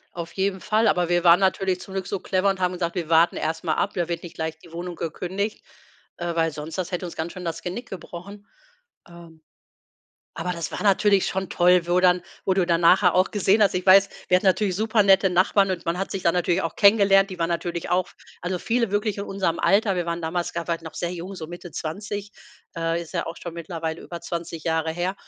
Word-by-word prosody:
Auf 170 -1 -6
jeden 190 -1 -1
Fall, 215 +1 +2
aber 175 -1 +2
wir 175 0 +1
waren 170 +2 +7
natürlich 190 -1 +1
zum 190 - -10
Glück 190 -1 -3
so 200 -1 -3
clever 190 +1 +1
und 195 -1 -3
haben 180 0 +1
gesagt: 170 -1 -3
„Wir 170 -3 -3
warten 165 +1 +4
erst 160 +2 -3
mal 160 - +1
ab, 200 - -1
da 175 -2 -1
wird 170 -1 -3
nicht 175 - -10
gleich 160 0 -4
die 170 - -17
Wohnung 175 +1 -5
gekündigt,“ 185 +6 -4 0.5
äh, 175 -1 -3
weil 165 -1 +1
sonst 150 +2 -7
das 185 0 -4
hätte 180 0 -2
uns 170 - -9
ganz 160 +2 -4
schön 180 -1 -8
das 165 - -4
Genick 210 +8 -5
gebrochen. 195 +3 -9 0.6
Ähm, 170 -2 -15 0.9
aber 165 +2 -3
das 170 -2 -5
war - - -4
natürlich 200 -1 +3
schon 190 -1 -3
toll, 175 0 +4
wo 180 +1 +3
dann 180 -1 +4 0.2
wo 190 - +2
du 185 -2 +2
dann 170 -1 +2
nachher 180 +1 +5
auch 185 +1 +3
gesehen 205 +1 +3
hast. 195 - +3
Ich 180 +1 -2
weiß, 195 +1 +7 0.2
wir 180 - +5
hatten 190 - -4
natürlich 190 0 +2
supernette 200 -3 +4
Nachbarn 190 +2 +3
und 185 -2 -3
man 170 +2 -1
hat 195 - -3
sich 195 - -4
da 170 - +4
natürlich 175 0 +1
auch 165 - -3
kennengelernt. 200 -1 +5
Die 185 - -7
waren 165 0 0
natürlich 170 0 -3
auch 180 0 +1 0.3
also 180 +1 -2
viele 230 +2 0
wirklich 205 0 0
in 200 - -3
unserem 190 -4 -2
Alter. 200 0 +3
Wir 175 - -1
waren 170 0 -2
damals 170 +2 -2
grade 170 0 -3
halt 165 - -4
noch 160 - -9
sehr 175 0 -3
jung, 180 +2 -7
so 160 - -6
Mitte 175 0 -9
20, 205 +5 -5 0.4
äh, 165 0 -1
ist 170 - -13
ja 170 - -1
auch 165 - -6
schon 170 -1 -7
mittlerweile 165 -1 -5
über 170 -1 -8
20 170 -2 -6
Jahre 160 -1 0
her. 175 +3 -2
180 Hz, 235 wpm, -24 LUFS, 170-195 Hz, 0.9 s, waren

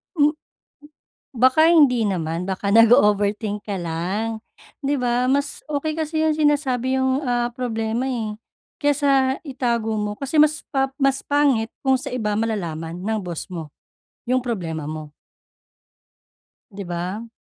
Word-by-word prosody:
M 295 -2 +4 1.1
Baka 260 +7 +5
hindi 280 -8 +5
naman, 165 -2 -2
baka 190 +1 -2
nag-o-overthink 210 -2 +4
ka 200 -2 -3
lang, 190 +7 -3 0.4
'di 280 0 0
ba. 250 +1 +1
Mas 285 +1 -1
okey 305 +1 -1
kasi 315 0 -1
yung 315 - +2
sinasabi 265 -4 +1
yung, 260 +2 +1
ah, 240 -3 0
problema 230 -1 -2
eh, 225 -5 -3 0.5
kesa 275 -2 +2
itago 235 -5 -1
mo 210 0 -3
kasi 280 +3 -2
mas 305 0 +3
pa 270 -1 +1
mas 275 -1 +1
pangit 275 -6 +2
kung 265 0 +4
sa - - -6
iba 220 -4 -1
malalaman 170 -7 -3
ng 215 +4 -2
boss 175 -3 -5
mo, 160 -4 -6 0.6
yung 255 0 +1
problema 170 -10 -3
mo. 155 -1 -6 1.6
‘Di 200 0 -7
ba? 180 +6 -4
240 Hz, 135 wpm, -22 LUFS, 205-275 Hz, 1.6 s, Baka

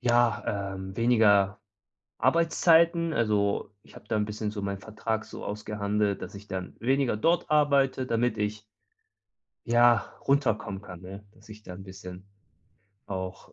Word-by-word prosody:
ja, 115 -5 +1
ähm, 95 0 -7
weniger 105 -4 +4 0.6
Arbeitszeiten. 165 +4 +3
Also, 105 -4 0
ich - - -19
habe - - -13
da 110 - -1
'n 105 - +1
bisschen 105 0 -4
so 105 -1 -5
meinen 100 -1 -3
Vertrag 110 +1 -3
so - - -9
ausgehandelt, 105 -1 -2
dass - - -7
ich 100 +1 -11
dann 95 -2 -5
weniger 130 -1 +1
dort 165 +9 +1
arbeite, 140 -3 +3
damit 115 -1 0
ich 105 +1 -2 1.0
ja, 120 -1 +4 0.2
runterkommen 110 -8 +1
kann, 90 -4 -10
ne? 95 +3 -10
Dass - - -21
ich 110 0 -12
da 90 - -9
'n 95 +2 -9
bisschen 95 0 -10 0.8
auch 95 -1 -6
105 Hz, 145 wpm, -27 LUFS, 100-120 Hz, 1.0 s, weniger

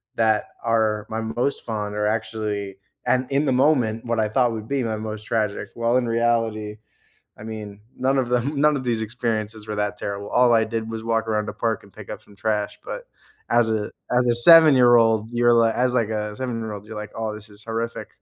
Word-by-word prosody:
that 110 -2 +2 0.2
are 110 -2 +1
my 110 - -3
most 120 +5 -1
fond 105 -2 -4
are 105 0 0
actually 105 -3 -3 0.3
and 130 0 +2
in 140 +2 +2
the 135 - +1
moment, 125 -4 +2
what 115 -1 -1
I 110 -1 +1
thought 120 +1 +2
would 110 0 -6
be 140 -2 -1
my 110 -2 -2
most 110 0 -6
tragic, 105 -3 -2
while 115 +1 +1
in 125 -2 0
reality, 115 -2 0 0.6
I 105 - -10
mean, 105 -2 -8 0.2
none 135 +1 +1
of 130 -2 0
them 135 +4 0
none 150 0 +4
of 135 - -3
these 115 -2 0
experiences 110 -1 -3
were 105 - -3
that 105 0 -1
terrible, 100 0 -5
all 125 -1 +4
I 110 -1 +4
did 115 0 -4
was 110 0 -6
walk 115 0 0
around 105 -1 0
the - - -3
park 115 -1 -1
and 100 - -19
pick 105 +1 -11
up - - -7
some 100 - -19
trash, 105 -1 -2
but - - -7 0.4
as 120 -1 +3
a 110 -1 -1 0.3
as 125 - +3
a 120 - +4
seven-year-old, 120 -6 +7
you're 120 0 +3
as - - +5
li 115 - +3
as, 125 0 +1
like, 115 -3 +1
a 105 -1 -3
seven-year-old, 110 -5 -5
you're 110 - -9
like, 105 0 -7
"Oh, 110 -1 -3
this 105 0 -10
is 105 +1 -10
horrific, 115 +1 -4
110 Hz, 215 wpm, -23 LUFS, 105-120 Hz, 0.6 s, seven-year-old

